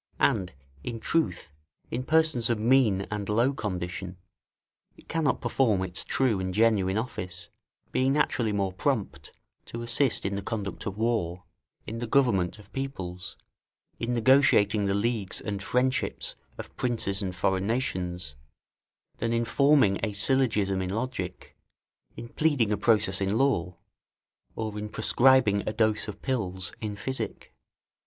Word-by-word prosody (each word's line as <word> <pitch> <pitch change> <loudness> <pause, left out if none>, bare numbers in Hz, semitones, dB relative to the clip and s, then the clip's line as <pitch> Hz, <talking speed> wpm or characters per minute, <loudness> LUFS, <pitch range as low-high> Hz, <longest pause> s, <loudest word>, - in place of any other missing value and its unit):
And, 95 -1 +2 0.3
in 115 +5 -4
truth, 90 - -1 0.4
in 125 - -2
persons 155 -7 +3
of 120 - +2
mean 110 -3 +3
and 105 -1 -3
low 120 +6 +2
condition, 90 -5 -4 0.8
it - - -19
cannot 160 -3 0
perform 110 -8 +2
its 90 0 -2
true 125 -7 +1
and 95 0 -3
genuine 105 -3 +3
office, 90 -7 -3 0.4
being 130 +1 +2
naturally 125 -6 +1
more 100 -2 -1
prompt 70 -6 -2 0.3
to 115 0 -6
assist 120 0 +1
in 100 - -1
the 100 - -2
conduct 100 -1 -4
of 100 0 -4
war, 105 -6 -1 0.4
in 115 +1 -5
the 120 - -3
government 110 -9 +2
of 105 0 -17
peoples, 95 -10 -5 0.6
in 120 +1 -1
negotiating 110 -5 +4
the 100 - +1
leagues 105 -2 -1
and 100 -2 -4
friendships 130 +5 0 0.2
of - - -9
princes 110 -5 -1
and 95 -2 -3
foreign 95 +1 0
nations, 90 - -2 0.9
than 115 0 -1
in 115 0 +1
forming 140 -7 +4
a 110 -2 -1
syllogism 105 -4 +1
in 90 - -3
logic, 110 -3 -4 0.6
in 120 - -7
pleading 140 -5 +1
a - - +3
process 105 -3 +2
in 100 +3 +1
law, 90 -11 +1 0.8
or 110 -2 -4
in 105 0 -5
prescribing 110 -2 +4
a - - -2
dose 110 -1 +1
of 105 - -8
pills 95 -9 -2
in 105 -2 -3
physic. 115 - -5
105 Hz, 145 wpm, -27 LUFS, 95-125 Hz, 0.9 s, negotiating